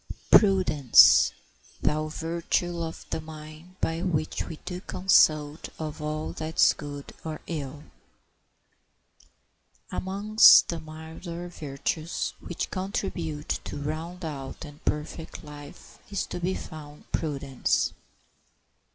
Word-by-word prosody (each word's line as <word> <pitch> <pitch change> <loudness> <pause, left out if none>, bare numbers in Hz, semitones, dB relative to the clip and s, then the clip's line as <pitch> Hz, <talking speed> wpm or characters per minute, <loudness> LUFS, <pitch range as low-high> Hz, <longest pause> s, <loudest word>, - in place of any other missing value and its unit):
] - - -28
"Prudence, 180 - +7 0.5
thou 155 +1 0
virtue 170 +2 -2
of 165 -1 -5
the - - -2
mind, 155 +3 -11
by 165 +1 0
which 160 -4 -1
We 165 - -6
do 180 -1 -5
consult 155 -6 +3
of 155 -1 -5
all 155 +1 -3
that's 160 +1 +3
good 145 -1 -8
or 155 -1 -5
ill." 145 -3 -5 2.1
Amongst 205 +3 +6
the 170 - -2
milder 160 +3 -8
virtues 155 +1 -3
which 175 - -5
contribute 175 -5 -3
to - - -5
round 165 +4 -5
out 140 0 -6
and 145 0 -13
perfect 150 +2 -3
life 145 -1 -12
is 200 -2 -2
to - - -6
be 180 +2 -1
found 150 -1 -10
Prudence. 140 -4 0
160 Hz, 110 wpm, -27 LUFS, 150-175 Hz, 2.1 s, Prudence